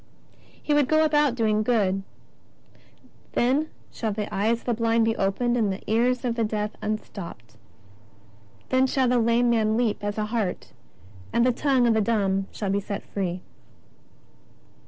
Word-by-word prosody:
X - - -30 0.2
He 300 - 0
would 290 -3 +3
go 310 +2 +4
about 295 -4 +2
doing 215 -3 +1
good: 205 -4 +1 0.6
" - - -29
Then 275 +6 +1 0.2
shall 220 -2 -3
the 210 0 -4
eyes 225 +4 +1
of - - -24
the 240 - +1
blind 230 0 +2
be 225 0 +1
opened, 240 +5 0
and 215 -5 +1
the 190 - -6
ears 245 +3 +1
of 240 - 0
the 230 -1 -1
deaf 210 -1 -2
unstopped. 195 - -6 1.1
Then 260 +1 +3
shall 260 0 +1
the 245 0 +3
lame 235 +1 +3
man 220 -1 +2
leap 230 -4 0
as 205 +1 -3
a 215 - 0
hart, 210 -4 -3 0.6
and 235 - +2
the 255 - +4
tongue 265 -1 +2
of 235 - +4
the 220 - +2
dumb 195 -3 0
shall 200 -3 -3
be 200 - +1
free." 190 -3 -4
225 Hz, 170 wpm, -25 LUFS, 205-245 Hz, 1.1 s, go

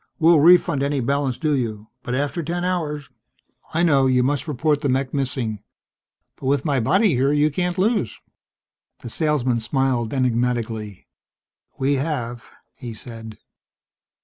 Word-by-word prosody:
We'll 165 -1 +5
refund 170 -2 +5
any 140 0 0
balance 135 0 0
due 155 -2 0
you. 110 -4 -3
But 125 - -3
after 145 +5 -1
ten 175 +3 -3
hours 150 -6 -2 0.3
..." - - -31
"I 170 - +2
know. 140 -6 +4
You 125 -1 +3
must 145 +4 -1
report 150 +1 0
the 145 - 0
mech 130 +1 0
missing. 125 -6 -2 0.8
But 130 - -6
with 140 +1 +1
my 140 -4 +1
body 180 - +3
here 135 +3 +2
you 150 +1 +2
can't 180 +4 -2
lose." 200 - 0 0.8
The 120 - -6
salesman 135 -6 +1
smiled 120 -1 0
enigmatically. 120 -5 -1 0.7
"We 140 +1 +1
have," 125 -5 -3 0.3
he 120 -3 -8
said. 115 -1 -10
135 Hz, 145 wpm, -22 LUFS, 120-150 Hz, 0.8 s, We'll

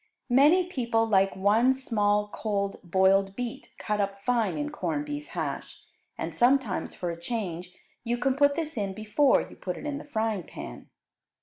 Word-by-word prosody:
Many 300 +8 +6
people 235 -9 0
like 195 -3 +3
one 215 +7 +4
small 210 -5 +1
cold 200 -2 -2
boiled 190 +2 +3
beet 245 -2 -5
cut 210 -1 -1
up 200 0 -2
fine 230 -4 +1
in 295 0 -3
corned 295 0 -2
beef 295 0 -5
hash, - - -5 0.3
and - - -4
sometimes 245 -5 +2
for 175 -1 -3
a 170 0 -8
change 180 -4 -4 0.3
you 240 0 -1
can 260 +2 +1
put 285 0 +4
this 315 -4 -3
in 195 -2 -2
before 220 +7 +3
you - - -14
put 180 -2 -5
it - - -8
in 290 -1 -3
the - - -9
frying 220 -7 -1
pan. 60 - -9
225 Hz, 175 wpm, -27 LUFS, 195-270 Hz, 0.3 s, Many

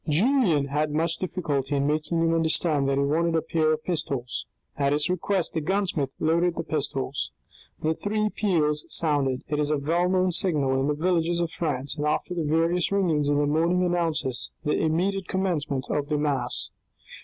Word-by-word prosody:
Julien 175 - +2
had 150 +2 0
much 165 +2 0
difficulty 150 -7 -2
in 140 0 +1
making 155 +3 0
him 165 0 +2
understand 160 -3 +2
that 135 - +1
he 140 - +2
wanted 165 +4 +1
a 160 - +2
pair 155 -1 +1
of 155 - -4
pistols. 135 -8 -3 0.3
At 140 0 +1
his 150 +3 +1
request 185 0 -1
the 160 - -1
gunsmith 180 -5 0
loaded 170 +2 +2
the 165 - -3
pistols. 140 -3 -2 0.5
The 160 +1 +2
three 215 +4 -1
peals 155 -9 +1
sounded; 140 -5 +1
it 150 -1 -1
is 150 -1 0
a 150 - +2
well 170 +5 +1
known 185 0 +2
signal 145 -7 +1
in 135 - 0
the 150 - +1
villages 170 +1 +1
of 170 -1 -1
France, 145 -4 -2
and 150 0 -1
after 155 +4 -1
the 175 - -2
various 165 +4 +1
ringings 165 -7 +1
in 145 - +2
the 145 - +2
morning 165 +5 +2
announces 165 -8 0
the 150 - 0
immediate 180 +4 0
commencement 155 -8 -1
of 145 -1 -1
Mass. 145 -5 0
155 Hz, 180 wpm, -26 LUFS, 145-175 Hz, 0.5 s, Julien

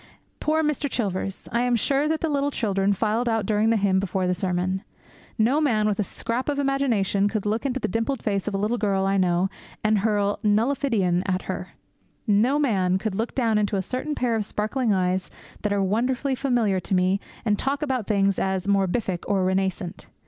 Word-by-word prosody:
Poor 315 +1 +1
Mr. 300 -1 0
Chilvers! 195 -5 -3
I 235 - +1
am 245 -1 +2
sure 275 +6 +1
that 315 0 0
the 325 - +1
little 285 -1 +1
children 200 -7 0
filed 220 +4 0
out 225 -2 0
during 215 +2 +2
the 230 - +3
hymn 195 -2 +2
before 190 -1 -1
the 180 - +1
sermon. 185 +1 -1 0.6
No 250 +7 +3
man 220 -8 +2
with 210 -1 -1
a - - +3
scrap 235 +7 -3
of 285 - -1
imagination 245 -8 +1
could 210 -1 -3
look 220 +6 0
into 265 0 -2
the - - -1
dimpled 225 +5 -2
face 200 -2 -1
of 205 - -1
a - - +1
little 215 +4 0
girl 195 -2 +1
I 195 0 +2
know 180 0 +2 0.4
and 215 -1 +3
hurl 205 -1 +1
'nullifidian' 215 -4 +2
at 185 -1 0
her. - - -5 0.5
No 225 +6 +3
man 190 -10 +2
could 215 +1 -3
look 225 +4 -3
down 225 -5 +2
into 205 0 0
a 190 - 0
certain 265 +8 -3
pair 240 -2 0
of 220 - 0
sparkling 215 +4 -1
eyes 185 -1 0 0.3
that 210 - -1
are 200 -1 +1
wonderfully 250 +7 0
familiar 240 -7 +1
to 185 +2 -1
me 185 +2 +2 0.3
and 210 -2 +1
talk 280 +3 -1
about 260 -7 -1
things 200 -2 +2
as 190 -1 -1
'morbific' 195 -1 0
or 195 -2 +1
'renascent.' 190 -1 -2
210 Hz, 200 wpm, -24 LUFS, 195-245 Hz, 0.6 s, the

